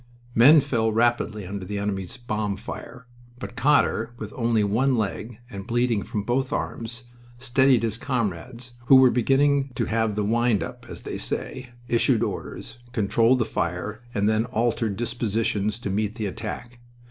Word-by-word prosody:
Men 145 +7 +7
fell 115 -5 0
rapidly 110 -2 +1
under 100 +1 -5
the 100 +3 -4
enemy's 100 -1 -3
bomb 105 -4 -2
fire, 125 +5 -9 0.3
but 125 - -8
Cotter, 125 -3 +2
with 110 -2 -7
only 115 -3 +2
one 120 +6 +2
leg, 105 +2 -3
and 100 -5 -8
bleeding 120 -2 +1
from 105 0 -4
both 125 +5 0
arms, 115 +2 -4 0.3
steadied 130 0 +3
his 115 0 -2
comrades, 120 0 -3 0.2
who 135 - +8
were 130 -1 +7
beginning 135 +3 +2
to - - 0
have 110 -2 0
the 105 - 0
wind 115 0 +2
up, - - -9
as - - -7
they - - -5
say, 125 -1 -4 0.2
issued 120 -2 +2
orders, 120 - -5
controlled 115 +4 +3
the 120 - +1
fire, 105 +3 -3
and 100 -2 0
then 110 +1 +2
altered 115 -3 0
dispositions 110 -2 -1
to 110 -5 -4
meet 105 +2 -1
the 110 -3 -3
attack. 120 +5 -6
115 Hz, 160 wpm, -25 LUFS, 105-125 Hz, 0.3 s, who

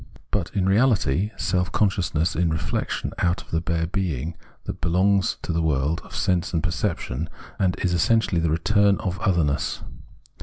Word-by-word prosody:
But, - - -1
in 95 -2 +1
reality, 100 - +3
self 90 -2 0
consciousness 90 -5 +1
is 90 - +1
reflexion 80 -1 -2
out 85 0 +1
of - - -22
the 80 - +1
bare 85 -1 0
being 85 -4 -2 0.3
that - - -6
belongs 95 +4 +2
to 90 - -2
the 85 - +1
world 75 0 0
of - - -11
sense 90 -1 0
and 80 - 0
perception, 80 - -2 0.3
and 95 -2 +2
is 90 - +1
essentially 90 0 +2
the 80 - +1
return 100 +5 +3
out - - -7
of 95 0 -2
otherness. 85 -7 0
85 Hz, 165 wpm, -24 LUFS, 80-95 Hz, 0.3 s, reality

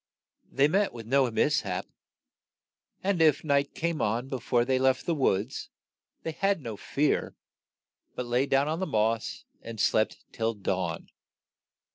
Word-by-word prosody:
They 140 +1 +4
met 195 +6 +1
with 115 -2 -8
no 135 +2 +3
mis 145 +6 +2
hap; 90 -4 -3 1.2
and 190 -3 +1
it 155 -3 +4
night 140 -2 +1
came 170 -2 -1
on 115 +5 0
be 130 - -3
fore 120 0 +1
they 130 0 +1
left 130 0 +2
the 170 - +1
woods, 125 -5 0 0.5
they 165 - -2
had 195 +3 +1
no 115 -7 -6
fear, 145 +8 0 0.8
but 125 - -3
lay 125 +3 +1
down 135 +1 +3
on 160 +2 -1
the 190 - -1
moss 110 +1 0 0.2
and 115 -1 -8
slept 110 - +1
till 115 0 -1
dawn. 100 - -2
130 Hz, 155 wpm, -28 LUFS, 115-150 Hz, 1.2 s, They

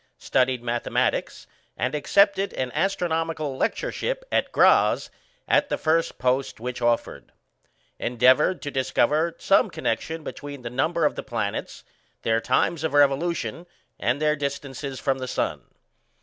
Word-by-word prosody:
Studied 125 -1 +1
mathematics, 120 0 -1 0.3
and 130 - -1
accepted 200 +6 +2
an 130 -1 -2
astronomical 165 -6 -1
lectureship - - -2
at - - +1
Graz - - +4 0.4
as - - +4
the - - 0
first 165 +1 +1
post 130 0 0
which 125 +1 -5
offered. 120 0 -1 0.7
Endeavoured 130 +9 +3
to 145 - -4
discover 145 +5 +1
some 195 - +3
connection 160 0 -3
between 145 -4 -8
the 120 - -5
number 155 +7 +1
of - - +2
the - - -5
planets, 110 -6 -4 0.4
their 115 0 +1
times 160 +6 +1
of 160 -2 -1
revolution, 165 +4 +1 0.3
and 125 +4 0
their 150 0 +2
distances 140 -2 -5
from 135 -1 0
the 130 - -4
sun. - - -2
140 Hz, 135 wpm, -24 LUFS, 125-165 Hz, 0.7 s, Graz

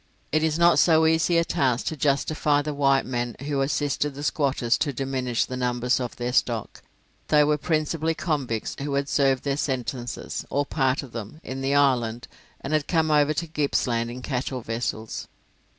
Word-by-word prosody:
It 155 - +2
is 160 -1 +1
not 170 0 +5
so 160 -2 +5
easy 160 +2 +3
a 170 - +3
task 130 -6 0
to 160 - -2
justify 145 +1 +1
the 150 0 -3
white 135 -1 +2
men 120 -2 -3
who 140 -1 -1
assisted 145 0 -1
the 145 - -6
squatters 135 -5 +1
to 145 - 0
diminish 130 -2 -1
the 130 - -6
numbers 125 0 0
of 125 -2 -4
their 120 0 -3
stock. 115 -4 0 0.5
They 150 -1 +5
were 150 0 +1
principally 160 0 0
convicts 140 - -2
who 140 0 -2
had 140 0 0
served 135 -2 +2
their 140 -1 -1
sentences, 125 -3 -3
or 145 +1 0
part 135 -1 0
of 130 - -11
them, 115 +6 -7
in 135 +1 -5
the 135 +1 +1
island, 120 -5 +2 0.3
and 135 - -4
had 155 -2 +1
come 160 -2 +2
over 150 0 +3
to 170 +2 -2
Gippsland 125 -6 0
in 125 +1 -8
cattle 130 -1 -3
vessels. 115 -1 -4
140 Hz, 180 wpm, -25 LUFS, 125-150 Hz, 0.5 s, not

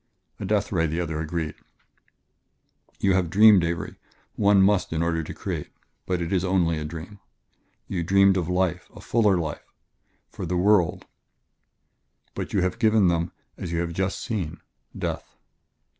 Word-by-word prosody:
"A - - -4
death - - 0
ray," 80 0 +1
the 80 +3 -2
other 80 -3 -2
agreed. 80 0 -3 1.5
"You 95 - +2
have 95 -3 +1
dreamed, 105 -1 +7
Avery 85 -1 -3 0.4
one 100 -1 +4
must 100 0 +2
in 80 0 0
order 85 -1 0
to 80 - -7
create - - -5 0.4
but 90 -2 0
it 85 - -3
is 95 -2 +1
only 90 -4 +1
a - - -4
dream. 85 +6 -8 0.7
You 90 - -2
dreamed 100 +2 +4
of 90 -2 -1
life 90 -1 0
a - - -10
fuller 105 -5 +2
life 80 -3 -5 0.6
for 90 - -6
the 90 +1 -1
world, 95 -2 +2 1.3
but - - -5
you - - 0
would - - +1
have 95 +4 -1
given 110 -4 +4
them, 85 0 0 0.3
as 85 - -5
you 85 - -1
have 85 -1 -3
just 95 +2 -1
seen, 100 -10 -4 0.4
death." - - -4
90 Hz, 165 wpm, -25 LUFS, 85-100 Hz, 1.5 s, dreamed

